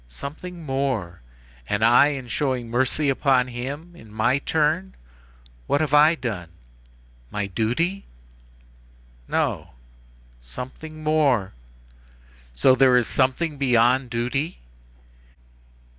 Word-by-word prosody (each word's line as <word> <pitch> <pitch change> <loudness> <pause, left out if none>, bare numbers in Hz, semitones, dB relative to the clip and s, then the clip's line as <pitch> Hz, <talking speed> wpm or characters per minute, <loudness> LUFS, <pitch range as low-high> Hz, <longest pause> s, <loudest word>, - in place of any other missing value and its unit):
Something 160 - -8
more. 135 - -2 0.5
And 105 +2 +1
I 120 +5 +6
in 135 -4 -4
showing 125 -2 -2
mercy 130 +5 +1
upon 135 -2 +2
him 140 +8 -6
in 110 -9 -15
my 120 +5 +1
turn—what - - -3
have 150 -2 -1
I 150 +3 +6
done? 105 - -5 0.8
My 105 +6 -3
duty? 125 - -1 1.2
No. - - -2 0.7
Something 130 - -9
more. 145 -10 +2 1.0
So 65 - +5
there 130 -1 +5
is 120 - +2
something 140 +5 0
beyond 125 0 +3
duty?" 125 +7 -2
130 Hz, 100 wpm, -23 LUFS, 115-150 Hz, 1.2 s, I